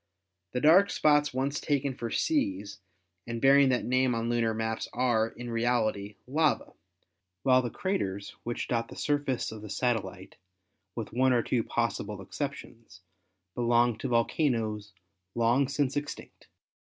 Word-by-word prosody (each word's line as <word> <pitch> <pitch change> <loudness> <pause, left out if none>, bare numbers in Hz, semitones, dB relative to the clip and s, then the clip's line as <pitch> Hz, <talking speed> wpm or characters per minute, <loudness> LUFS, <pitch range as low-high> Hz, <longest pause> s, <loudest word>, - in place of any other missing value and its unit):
The 125 - -1
dark 180 +7 +6
spots 150 -1 +3
once 135 +2 -1
taken 140 -2 0
for 120 -2 -5
seas 100 - -1 0.5
and 115 0 -4
bearing 140 +1 +6
that 125 -1 0
name 130 0 +2
on 115 0 -2
lunar 115 -1 +1
maps 110 0 -2
are, 120 -3 +2
in 120 +1 -8
reality, 110 -3 0
lava, 155 +4 0 0.7
while 130 -1 +5
the 120 - -3
craters 100 - -3
which 120 0 -4
dot 115 -1 -1
the - - -11
surface 145 -5 -1
of 110 -1 -8
the 105 - -9
satellite, 95 -6 -2 0.6
with 115 -3 -5
one 130 +1 +3
or 120 -2 +2
two 120 -3 0
possible 105 -3 -2
exceptions, 115 -2 -7 0.5
belong 120 0 +2
to - - -3
volcanoes 115 -4 0 0.4
long 120 +4 +3
since 140 -1 -1
extinct. 145 0 -6
120 Hz, 145 wpm, -29 LUFS, 110-135 Hz, 0.7 s, dark